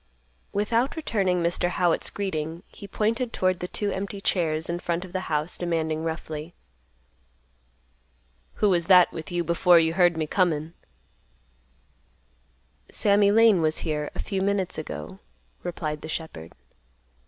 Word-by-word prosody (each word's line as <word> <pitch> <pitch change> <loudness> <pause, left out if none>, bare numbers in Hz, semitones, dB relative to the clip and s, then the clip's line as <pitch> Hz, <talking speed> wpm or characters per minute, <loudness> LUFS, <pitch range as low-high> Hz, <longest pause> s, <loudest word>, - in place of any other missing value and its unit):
Without 230 +6 0
returning 195 - 0
Mr. 175 +1 0
Howitt's 175 -2 +1
greeting, 165 -3 -4
he 200 - -12
pointed 230 +4 -1
toward 185 -3 0
the 180 - -4
two 205 +2 -2
empty 200 +1 -4
chairs 160 -5 0
in 170 0 -2
front 175 +1 -2
of 180 - -14
the 185 0 -3
house, 155 +2 -1
demanding 160 -2 -1
roughly, 160 0 -5 2.0
"Who 210 - +2
was 175 -3 +1
that 180 -2 +7
with 160 -1 -7
you 175 0 0
before 170 +1 +4
you 165 0 +3
heard 175 -2 +3
me 160 - 0
comin'?" 160 -2 0 2.2
"Sammy 200 0 +3
Lane 215 -3 +5
was 155 0 +1
here 150 -2 -2
a - - -3
few 195 -2 -2
minutes 195 -3 0
ago," 85 - -7 0.4
replied 155 -3 -4
the 155 - -8
shepherd. 155 - -6
175 Hz, 140 wpm, -25 LUFS, 160-195 Hz, 2.2 s, that